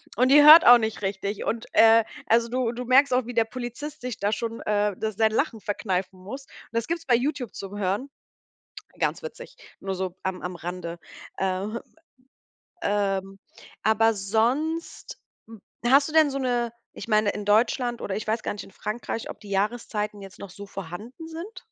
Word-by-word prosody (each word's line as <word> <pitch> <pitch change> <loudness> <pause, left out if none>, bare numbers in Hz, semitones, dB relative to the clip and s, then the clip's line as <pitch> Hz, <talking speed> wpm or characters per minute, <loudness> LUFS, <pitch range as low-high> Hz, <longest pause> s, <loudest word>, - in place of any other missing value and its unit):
Und 255 +3 +3
die 290 +1 +8
hört 315 +3 +10
auch 245 0 +10
nicht 220 -2 -3
richtig. 200 +1 -3
Und, 230 +1 -2
äh, 225 0 +7 0.2
also, 230 +1 +3
du 250 -1 0
du 245 +1 -6
merkst 260 +1 +5
auch, 250 -2 +2
wie 245 - -6
der 230 -1 +3
Polizist 255 +6 -7
sich 250 -2 -5
da 205 +1 0
schon, 230 +1 -3
äh, 210 -2 0
s 215 -2 -2
sein 220 -1 +3
Lachen 225 -2 -1
verkneifen 190 -2 -3
muss. 265 +8 -7
Und - - -18
das 230 0 -1
gibt's 335 0 -3
bei 245 -3 +4
Youtube 255 -1 -2
zum 200 +1 -7
Hören. 205 +8 -1 0.9
Ganz - - 0
witzig, 480 - -9 0.2
nur 195 -1 -3
so 185 -1 -4
am 190 -1 -3
am 180 0 -4
Rande. 170 0 -6 0.4
Ähm, 195 +4 -2 1.0
ähm, 195 -1 -1 0.4
aber 225 +1 +3
sonst 245 +12 -1 0.3
hm, 225 -2 -13 0.3
hast 280 +2 +5
du - - -7
denn 315 -2 +5
so 275 - -3
'ne 245 -3 -1 0.3
ich - - -7
meine, 215 -1 +3
in 210 - -5
Deutschland, 235 +3 +2
oder, 190 - -3
ich 215 - -5
weiß 220 +1 -1
gar - - -2
nicht, 205 - -8
in - - -15
Frankreich, 220 +2 -5
ob - - -8
die 205 - -12
Jahreszeiten 210 0 -2
jetzt 195 0 -12
noch 200 - -8
so 200 +2 -10
vorhanden 205 - -8
sind? 335 +7 -8
225 Hz, 190 wpm, -25 LUFS, 200-250 Hz, 1.0 s, hört